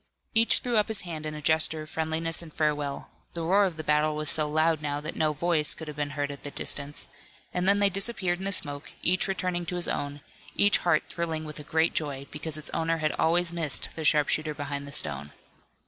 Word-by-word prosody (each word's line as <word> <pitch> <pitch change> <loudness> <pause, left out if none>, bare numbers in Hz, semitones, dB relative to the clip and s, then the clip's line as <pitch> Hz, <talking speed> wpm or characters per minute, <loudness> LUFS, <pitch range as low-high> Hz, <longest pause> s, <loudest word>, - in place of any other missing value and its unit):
Each 225 0 +4
threw 245 -2 0
up 210 - +3
his 220 -3 +2
hand 160 -3 -6
in 155 - -5
a 150 - -8
gesture 160 0 +3
of 155 - -12
friendliness 160 +1 -1
and 165 -2 -11
farewell 150 -2 -2 0.2
the 170 - -3
roar 195 +5 +4
of 175 -4 -3
the 155 - -5
battle 150 0 +2
was 150 0 +3
so 155 -1 +2
loud 155 +1 +2
now 145 -1 -2
that 155 +2 -5
no 155 -1 +2
voice 155 0 +3
could 160 - -9
have 150 - -6
been 145 -1 -1
heard 145 0 -1
at 140 - -9
the 145 - -6
distance 145 +1 -2 0.5
and 180 +1 +1
then 200 - +5
they 205 0 +4
disappeared 195 -2 +1
in 190 - -4
the 195 - 0
smoke, 145 -6 -1
each 180 +1 +2
returning 185 -2 -2
to 180 - -3
his 175 -1 +1
own, 145 0 -3 0.3
each 205 0 +4
heart 170 -3 +2
thrilling 160 -2 -3
with 150 -1 -7
a - - -7
great 160 +2 +1
joy, 140 -3 -2
because 155 0 -4
its 155 - -3
owner 165 0 0
had 155 -1 0
always 170 +1 +3
missed 160 -5 +1
the 160 - -5
sharpshooter 150 0 +2
behind 145 -1 -5
the - - -9
stone. 75 - 0
155 Hz, 230 wpm, -27 LUFS, 150-175 Hz, 0.5 s, then